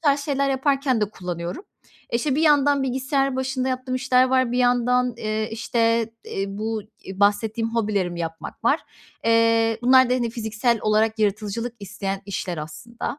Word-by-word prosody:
tarz 285 -1 +3
şeyler 275 -1 0
yaparken 270 -2 +1
de 210 -1 0
kullanıyorum. 175 - -5 0.5
İşte, 260 +4 +1
bir 305 - +1
yandan 285 -2 +4
bilgisayar 270 +1 0
başında 260 0 -1
yaptığım 255 0 -3
işler 255 0 +3
var. 260 -2 +2
Bir 250 - 0
yandan, 245 0 +2
eee, 215 -1 -2
işte, 230 0 0
eee, 195 - -3
bu, 215 +2 -3 0.2
iii, 190 +1 -8
bahsettiğim 220 +3 +1
hobilerimi 200 -6 -1
yapmak 165 0 -6
var. - - +3 0.4
Eee, 230 0 +3
bunlar 260 0 +6
da, - - +4
hani, 240 -2 -1
fiziksel 225 +1 0
olarak 215 +1 +2
yaratıcılık 215 +3 -1
isteyen 195 0 -4
işler, 180 -4 -4
aslında. 160 - -6
230 Hz, 155 wpm, -23 LUFS, 215-260 Hz, 0.5 s, bunlar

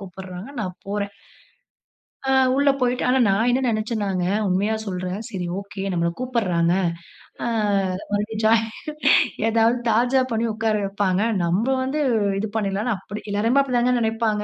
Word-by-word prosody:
கூப்புடுறாங்க. 190 +2 -8
நான் 185 -3 -4
போறேன். 200 0 -2 1.2
ஆ - - +3 0.2
உள்ள 280 0 +3
போய்ட்டு 250 +1 +1
ஆனா 260 +1 +3
நான் 220 +5 +2
என்ன 260 +2 +1
நெனச்சேன்னாங்க, 215 -4 -1 0.2
உண்மையா 200 +4 +1
சொல்றேன். 185 0 -3
சரி 180 -3 -4
ஓகே 200 -1 -7
நம்மல 170 0 +1
கூப்புடுறாங்க. 185 -10 +1 0.7
அ - - 0 0.6
மறுபடியும் 210 +2 -1
ஜாய்னு 225 0 +4 0.8
ஏதாவது 230 +2 +3
தாஜா 250 +4 +3
பண்ணி 225 +1 0
உக்கார 220 0 0
வைப்பாங்க. 195 0 0 0.2
நம்ம 180 +7 +1 0.2
வந்து 290 +3 -1 0.4
இது 215 0 -2
பண்ணிடலாம்ன்னு 210 +2 -1
அப்படி 205 +3 -8
எல்லாருமே 230 +7 +3
அப்படி 250 -3 -1
தாங்க 250 +1 +2
நினைப்பாங்க. 220 -1 0
215 Hz, 135 wpm, -23 LUFS, 195-235 Hz, 1.2 s, ஜாய்னு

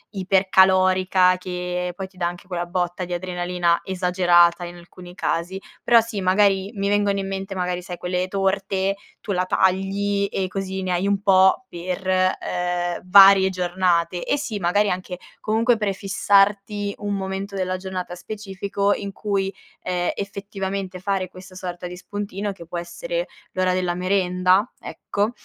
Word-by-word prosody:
ipercalorica 185 -1 +4
che 180 0 -3
poi 190 0 -5
ti 190 - -28
dà 175 -1 0
anche 175 +1 -7
quella 175 -2 -3
botta 175 0 -2
di 180 0 -5
adrenalina 175 -1 0
esagerata 180 -2 +3
in 175 0 -7
alcuni 175 +1 -13
casi. 180 +1 -2 0.2
Però 235 -1 +6
sì 225 -3 -3
magari 195 +1 +3
mi 200 0 -1
vengono 205 -1 +2
in 195 - -3
mente 195 0 -4
magari 180 -1 -2
sai 175 0 -7
quelle 180 +1 -2
torte, 195 0 0 0.2
tu 205 - -5
la 180 - +1
tagli 195 +2 +1
e 190 -1 -1
così 190 0 -4
ne 185 - -2
hai 180 +3 0
un 200 -1 +1
po' 190 +4 +4
per, 180 0 -5
ehm, 180 -1 0
varie 195 0 +8
giornate. 180 -1 0
Eh, - - 0
sì, 225 -7 -4
magari 200 +4 +2
anche, 180 0 -4 0.2
comunque, 225 +3 +2
prefissarti 200 0 +1
un 205 0 -2
momento 195 +1 -4
della 185 -1 -1
giornata 185 -1 -5
specifico 200 +1 -2
in 200 -1 -5
cui, 195 -2 -2 0.3
ehm, 180 -1 -1
effettivamente 195 -2 -5
fare 190 -1 -1
questa 185 0 -13
sorta 180 -1 -6
di 180 0 -8
spuntino, 205 +1 -4
che 180 -3 -11
può 175 - -5
essere - - -4 0.3
l'ora 185 -1 +1
della 180 -1 0
merenda, 185 +2 +2
ecco, 205 +3 -2
190 Hz, 155 wpm, -23 LUFS, 180-200 Hz, 0.3 s, varie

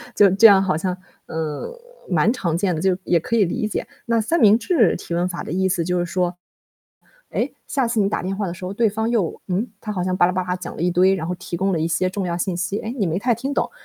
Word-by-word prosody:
就 200 -2 +6
这 200 +4 +4
样 200 -2 +6
好 185 -5 0
像， 180 +1 -2 0.3
嗯， 155 -2 -4 0.4
蛮 180 +4 +3
常 175 -10 -1
见 180 0 0
的， 155 - -3
就 190 -1 +2
也 175 - +3
可 230 +8 -2
以 215 - +4
理 215 +5 -2
解。 - - -4 0.2
那 230 -1 +2
三 330 +10 0
明 215 0 +6
治 245 - +3
提 170 - -7
问 175 +1 +1
法 175 - -5
的 - - -7
意 190 +1 +1
思 180 -2 0
就 180 +2 -1
是 175 - 0
说， 180 0 -1 0.9
哎， - - -1 0.2
下 265 -5 0
次 230 -2 0
你 200 -1 +2
打 - - -2
电 190 +1 -2
话 200 -1 -2
的 170 - -4
时 180 +1 -8
候 190 - -4
对 225 +1 +2
方 220 +2 -2
又 205 -9 0
嗯， 195 +6 -1
他 210 - -5
好 180 -3 -2
像 185 0 -1
吧 - - +5
啦 180 - +1
吧 185 0 -1
啦 180 0 -2
讲 180 - -7
了 - - -6
一 180 - +2
堆， 185 +2 +4
然 170 -3 -3
后 180 - -2
提 175 - -6
供 195 +3 0
了 165 - 0
一 160 - 0
些 180 +2 0
重 190 0 -3
要 170 -1 -2
信 175 0 -2
息， 180 +4 -2
哎， 225 0 -5
你 205 - +1
没 170 +1 -1
太 240 +1 +1
听 270 +4 -3
懂。 - - 0
185 Hz, 310 characters per minute, -21 LUFS, 175-210 Hz, 0.9 s, 就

